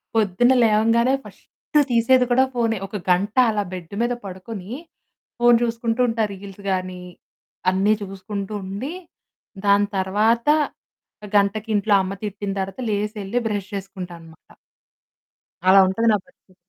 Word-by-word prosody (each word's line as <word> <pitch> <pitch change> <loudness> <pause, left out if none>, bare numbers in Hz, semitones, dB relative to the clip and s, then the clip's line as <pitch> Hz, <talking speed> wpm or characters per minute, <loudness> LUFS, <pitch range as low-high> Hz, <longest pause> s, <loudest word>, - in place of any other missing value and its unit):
పొద్దున్న 220 +4 +3
లేవంగానే 230 +3 +3
ఫస్ట్ 300 - -3
తీసేది 250 +2 +4
కూడా 260 +2 +5
ఫోనే. 230 -2 0
ఒక 210 - -10 0.2
గంట 200 +4 +1
అలా 210 -2 0
బెడ్డు 180 +1 -7
మీద 240 +1 +1
పడుకుని 190 +1 -8 0.7
ఫోను 240 0 +6
చూసుకుంటూ 230 0 -1
ఉంటా. 225 -1 0
రీల్స్ 195 0 -11
గాని 185 -1 -3 0.7
అన్నీ 195 +3 +3
చూసుకుంటూ 195 +1 -6
ఉండి, 205 - -5 0.7
దాని 200 0 +4
తర్వాత 215 +7 +1 0.9
గంటకి 205 +2 +2
ఇంట్లో 205 +1 +2
అమ్మ 190 +1 -3
తిట్టిన 205 0 -4
తర్వాత 195 +5 -4
లేసెళ్లి 210 +2 -2
బ్రష్ 205 -3 -3
చేసుకుంటాననమాట. 175 -4 -9 1.2
అలా 195 +1 +8
ఉంటది 225 +5 +1
నా 210 - +2
పరిస్థితి. 235 -8 -27
205 Hz, 120 wpm, -22 LUFS, 190-230 Hz, 1.2 s, అలా